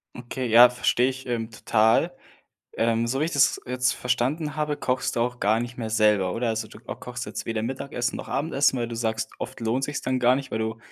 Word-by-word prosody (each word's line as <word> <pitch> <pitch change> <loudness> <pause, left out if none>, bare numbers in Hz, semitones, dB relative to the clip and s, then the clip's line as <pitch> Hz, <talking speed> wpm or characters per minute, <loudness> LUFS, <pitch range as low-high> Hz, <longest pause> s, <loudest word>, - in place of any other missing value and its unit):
Okay, 125 +1 -5
ja, 120 +2 +8
verstehe 125 0 +1
ich, 130 0 -7
ähm, 115 -2 -3
total. 110 +9 +2 0.6
Ähm, 115 0 +1
so 130 +4 -1
wie - - +2
ich 165 - -3
das 140 -2 +3
jetzt 125 +1 +1
verstanden 135 +5 -1
habe, 150 -1 -1
kochst 125 0 -1
du - - +1
auch 125 +1 -1
gar 110 +2 +2
nicht 120 +1 -5
mehr 115 -3 -4
selber, 105 -4 +3
oder? 115 +3 -1
Also, 110 0 -2
du 105 - -14
ko 115 - -7
kochst 120 -1 -7
jetzt - - -5
weder 115 -1 -2
Mittagessen 125 0 -3
noch - - -7
Abendessen, 140 -2 +1
weil 120 -1 -2
du 115 - -6
sagst, 110 -1 -2
oft - - -6
lohnt 115 +4 0
sich's 145 0 -3
dann 130 0 -1
gar 125 0 +4
nicht, 135 0 -4
weil 110 - -2
du 110 0 -3
120 Hz, 230 wpm, -25 LUFS, 115-130 Hz, 0.6 s, ja